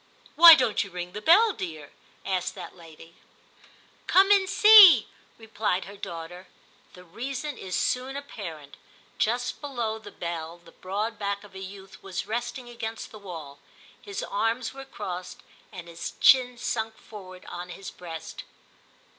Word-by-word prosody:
' - - -33
Why 335 0 +11
don't 250 -6 +1
you 200 - -10
ring 180 -1 -6
the 210 - -7
bell, 405 - +5
dear 155 - -7
} - - -30
' - - -33
asked 180 - -3
that - - -9
lady. 165 -1 -15 0.9
'Come 390 +2 +5
and 390 -2 +4
see,' 395 - +8 0.3
replied 220 -4 -2
her 200 - -11
daughter. 175 0 -8 0.5
The 180 - -14
reason 260 - -6
is 185 -5 -6
soon 260 +2 -1
apparent. 170 - -9 0.4
Just 245 +3 -1
below 240 -6 -3
the 215 -2 -11
bell 170 -1 -6
the 170 -1 -19
broad 205 +5 -4
back 200 0 -3
of 205 - -16
a 190 - -9
youth 190 0 -11
was 190 -1 -5
resting 240 +3 -5
against 225 -2 -7
the 215 - -11
wall; 160 -8 -10 0.4
his 405 -1 -6
arms 225 +4 -2
were 270 0 -10
crossed 180 -8 -7 0.3
and 180 -4 -10
his 170 0 -7
chin 250 -2 +5
sunk 220 -2 -3
forward 185 -4 -12
on 175 +1 -7
his 190 +2 -9
breast. 165 -2 -9
205 Hz, 160 wpm, -26 LUFS, 180-250 Hz, 0.9 s, Why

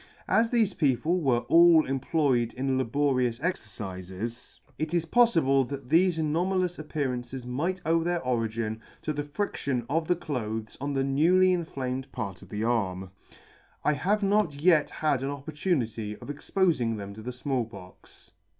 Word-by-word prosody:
As 225 +1 +3
thefe 225 -5 +1
people 155 +5 +2
were 125 -5 +2
all 165 +5 +6
employed 135 -3 +1
in 130 +1 -1
laborious 130 -1 +1
exercifes, 100 - -4 0.7
it 155 +2 -1
is 170 -1 +1
poffible 165 - +4
that 140 -3 -6
thefe 170 +2 +4
anoma 170 +5 +1
lous 180 -2 -1
appearances 130 -4 -3
might 165 +10 -2
owe 165 +1 +2
their 175 0 0
origin 115 -3 -2 0.2
to 155 - -1
the 145 - -2
fridtion 145 - -2
of 160 +1 0
the 180 - +3
clothes 110 -9 -4
on 140 0 -2
the 135 -1 +1
newly 175 +7 +4
inflamed 135 -6 -3
part 100 -7 -5
of - - -14
the 105 +1 -3
arm. 95 -6 -1 0.7
I 150 - +3
have 195 +9 0
not 200 -6 +2
yet 155 +1 +3
had 150 -4 0
an 135 - -2
opportunity 140 - -2
of - - -11
expofing 145 - 0
them 100 -1 -7
to 110 - -10
the 125 +3 -5
Small 130 0 -1
Pox. 95 -5 -14
140 Hz, 160 wpm, -27 LUFS, 120-165 Hz, 0.7 s, all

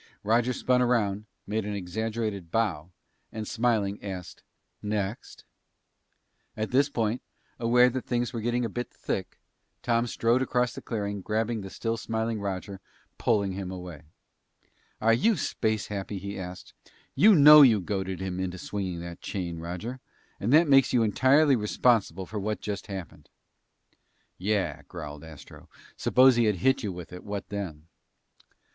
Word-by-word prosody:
Roger 115 +4 +2
spun 125 0 +1
around, 105 -4 +1 0.2
made 110 +2 -2
an 105 0 -4
exaggerated 105 0 -3
bow, 90 -7 -1 0.4
and 110 -1 -5
smiling, 110 -4 0
asked, 95 -4 -7 0.4
"Next?" 105 0 -4 1.1
At 110 0 -3
this 140 +3 +3
point, 115 -2 -1 0.4
aware 125 +1 +5
that 125 0 -3
things 120 -1 -1
were 115 - -3
getting 120 +2 0
a - - 0
bit 120 +1 -5
thick, - - -5 0.5
Tom 120 0 +1
strode 115 +2 +1
across 125 -2 0
the - - -8
clearing, 105 -3 -3
and 95 - -9
grabbing 110 +2 -1
the 95 - -7
still 115 +3 -3
smiling 110 0 -2
Roger, 100 0 -4 0.4
pulled 100 -4 +1
him 95 -1 -5
away. 90 -5 -8 1.0
"Are 115 +1 +4
you 210 - +3
space 110 -6 -1
happy?" 100 0 -5
he 100 +2 -6
asked, 90 0 -8 0.4
"You 210 0 +6
know 150 0 +10
you 120 -7 +7
goaded 95 0 -3
him 95 -1 -3
into 95 -1 -3
swinging 90 -2 -4
that 85 0 -8
chain, 85 -4 -4
Roger. 90 +10 -6 0.4
And 110 - -1
that 160 +3 +6
makes 135 -2 +5
you 120 -2 +4
entirely 135 +6 +4
responsible 105 -4 +1
for 105 +3 -5
what 105 +2 -2
just 100 -1 -5
happened!" 95 -4 -8 1.1
"Yeah," 100 +1 -1
growled 75 -3 -8
Astro. 80 -3 -13 0.3
"Suppose 130 -1 +5
he 120 - +4
had 105 -2 +2
hit 130 +9 +2
you 105 -5 -3
with 90 0 -9
it, 90 - -9 0.3
then 100 -1 -3
what?" 80 - -11
105 Hz, 155 wpm, -27 LUFS, 95-120 Hz, 1.1 s, know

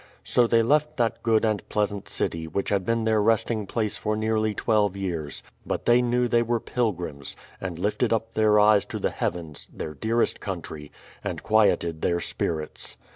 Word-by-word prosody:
So 120 -1 +3
they 115 0 +4
left 150 +4 +2
that 115 -3 0
good 115 -1 +3
and 110 -2 +1
pleasant 105 -2 -1
city, 80 0 -2
which 95 +5 -2
had 100 -2 +1
been 115 +4 0
their 110 -1 +2
resting 110 -1 +1
place 110 -1 -1
for 105 0 -1
nearly 110 -1 0
twelve 105 -4 +1
years; 85 -7 -4 0.2
but - - -3
they 120 +1 +5
knew 125 0 +1
they 120 0 +3
were 120 0 0
pilgrims, 90 - -3 0.3
and 90 -3 -4
lifted 105 +5 0
up 115 0 -1
their 105 -1 +4
eyes 105 -1 +5
to - - -5
the - - -1
heavens, 80 -4 -4
their 75 - -6
dearest 115 +9 0
country, 80 -6 -6 0.3
and - - -4
quieted 100 -7 +2
their 85 0 +1
spirits. 80 -2 -3
105 Hz, 180 wpm, -25 LUFS, 90-115 Hz, 0.3 s, they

